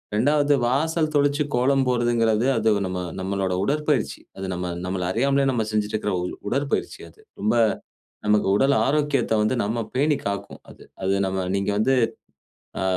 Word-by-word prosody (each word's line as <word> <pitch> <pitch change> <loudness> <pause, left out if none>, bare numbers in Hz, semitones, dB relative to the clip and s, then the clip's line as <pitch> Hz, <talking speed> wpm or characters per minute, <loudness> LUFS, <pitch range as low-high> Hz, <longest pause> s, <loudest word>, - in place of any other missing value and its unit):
2வது 145 +4 +3
வாசல் 155 +5 +1
தொளிச்சி 145 +1 +2
கோலம் 135 +2 +2
போட்றதுங்குறது, 120 -2 +2
அது 110 0 +2 0.2
நம்ம 90 0 -3 0.2
நம்மளோட 95 0 -1
உடற்பயிற்சி. 150 +4 0 0.2
அது 95 - -5
நம்ம 90 0 -4 0.2
நம்மள 90 0 -2
அறியாமலே 140 +4 +2
நம்ம 115 -3 0
செஞ்சுட்டிருக்குற 105 -1 -1 0.4
உடற்பயிற்சி 140 +3 -1
அது. - - -24 0.2
ரொம்ப 110 +3 +1 0.7
நமக்கு 105 -1 +3
உடல் 135 +3 +3
ஆரோக்கியத்தை 140 -5 +1
வந்து 110 +4 +1
நம்ம 115 +3 -2 0.2
பேணி 145 +2 +2
காக்கும், 100 0 -5
அது. - - -14 0.2
அது 95 +1 +1
நம்ம 95 0 -2
நீங்க 100 +1 -1
வந்து, 130 +5 +3 0.9
ஆ, - - -1
120 Hz, 145 wpm, -23 LUFS, 105-140 Hz, 0.9 s, 2வது